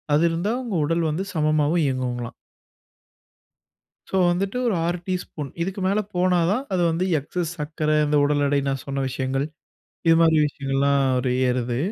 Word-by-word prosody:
அது 155 - +3
இருந்தா 175 +6 -1
உங்க 230 -6 -4
உடல் 165 +1 0
வந்து 170 +6 -2
சமமாவும் 155 +1 +2
இயங்கும்ங்களாம். 125 -3 -2 1.8
சோ - - -3 0.2
வந்துட்டு 195 +6 -1
ஒரு 220 - +2
6 175 +1 0
டீஸ்பூன். 180 -6 -4
இதுக்கு 190 +3 -3
மேல 200 +2 +2 0.2
போனாதான் 180 +5 +2
அது 180 - +1
வந்து 170 +3 0
எக்ஸஸ் 165 +4 -4
சர்க்கர. 155 +1 -2 0.2
இந்த 150 0 +1
உடல் 145 0 +2
எடை, 140 0 +2
நான் 135 -1 -2
சொன்ன 135 0 -2
விஷயங்கள். 130 +2 -1 0.6
இது 165 - +6
மாரி 160 -1 +5
விஷயங்கள்லாம் 140 0 0 0.2
ஒரு 125 0 -1 0.2
ஏறுது. 125 -1 -1
155 Hz, 150 wpm, -23 LUFS, 140-175 Hz, 1.8 s, இது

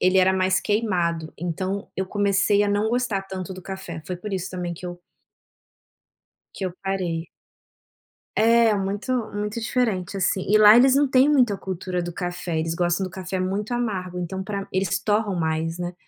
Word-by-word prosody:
Ele 185 +1 +4
era 185 0 +5
mais 185 0 +2
queimado, 175 -7 0
então 185 +4 -3
eu 190 - 0
comecei 200 0 +2
a - - 0
não 205 +2 +1
gostar 240 -5 0
tanto 190 -1 -6
do 185 - -10
café, 190 -4 -7
foi 180 - -4
por 200 +3 -7
isso 185 -1 -3
também 175 -2 -4
que 180 - -11
eu 175 0 -6 1.5
que 195 - -5
eu 185 - -2
parei. 180 -4 -2 1.1
É, 230 0 +4
muito 200 +5 -2 0.2
muito 210 +2 -3
diferente, 220 -6 -1
assim. 190 0 0
E 215 - +5
lá 215 +1 +9
eles 260 +2 +6
não 285 0 +4
têm 260 +2 +5
muita 250 -8 +4
a - - -4
cultura 185 -1 -3
do 175 0 -5
café, 175 -2 -3
eles 165 +1 -1
gostam 175 +2 +1
do 185 - -5
café 185 +1 -4
muito 200 +5 -2
amargo, 190 -7 -2
então 190 +2 -4
pra 200 0 -4
eles 190 +1 +1
torram 210 0 0
mais, 160 0 -1
né, 175 0 -4
190 Hz, 185 wpm, -24 LUFS, 180-210 Hz, 1.5 s, lá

